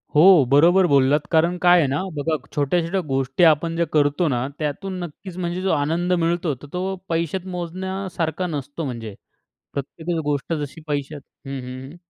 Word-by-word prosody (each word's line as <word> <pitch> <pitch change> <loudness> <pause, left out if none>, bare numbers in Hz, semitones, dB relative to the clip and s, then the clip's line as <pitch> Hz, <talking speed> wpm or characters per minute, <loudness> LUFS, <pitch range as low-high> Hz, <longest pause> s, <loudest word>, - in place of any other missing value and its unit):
हो, 150 - +7 0.3
बरोबर 175 +6 +6
बोललात 140 0 +4
कारण 170 +2 +3
काय 175 0 +7
आहे 150 - +3
ना 140 +2 -1
बघा, 155 +2 0 0.2
छोट्या-छोट्या 170 +6 +1
गोष्टी 135 +4 0
आपण 165 +1 +4
जे 170 - +2
करतो 150 +3 +2
ना 125 -2 0
त्यातून 175 +6 -3
नक्कीच 175 +2 -9
म्हणजे 175 0 -2
जो 190 - +1
आनंद 165 +4 +1
मिळतो, 170 -2 +1
तर 135 +4 -13
तो 185 +2 -2
पैशात 170 +2 -1
मोजण्यासारखा 180 0 -3
नसतो 145 0 -4
म्हणजे, 115 -6 -6 0.6
प्रत्येकच 160 +4 -3
गोष्ट 145 +2 -1
जशी 150 0 -5
पैशात 145 0 -3 0.3
हं, 135 0 -4
हं. 130 +4 -8
160 Hz, 160 wpm, -22 LUFS, 145-175 Hz, 0.6 s, हो